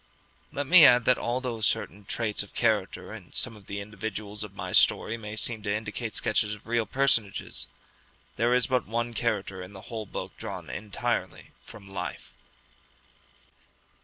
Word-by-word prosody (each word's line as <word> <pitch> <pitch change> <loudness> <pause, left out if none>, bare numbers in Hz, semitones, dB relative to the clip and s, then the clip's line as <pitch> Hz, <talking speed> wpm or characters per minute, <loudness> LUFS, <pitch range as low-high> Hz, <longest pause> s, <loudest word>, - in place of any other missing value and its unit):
Let 145 - -2
me 170 +4 +9
add 125 -4 +8
that 125 - +5
although 120 -1 -2
certain 100 -1 -1
traits 110 0 -1
of - - -10
character - - +1
in - - -11
some 120 -3 -1
of 100 -2 -16
the 100 - -4
individuals 105 0 -5
of 100 -2 -9
my - - -5
story 115 - +4
may 105 -2 -6
seem 110 0 0
to 100 -1 -2
indicate 110 +1 -3
sketches 105 -1 +1
of 105 - -18
real 115 -1 +1
personages, 110 - 0 0.7
there 120 +1 +2
is 125 - +3
but 125 -1 +1
one 120 +2 -1
character 105 -5 -1
in 90 +2 -9
the 95 - -9
whole 110 -2 -4
book - - -6
drawn - - -6
entirely 105 -2 -3 0.2
from 100 - -12
life. 95 0 -6
110 Hz, 160 wpm, -28 LUFS, 100-120 Hz, 0.7 s, me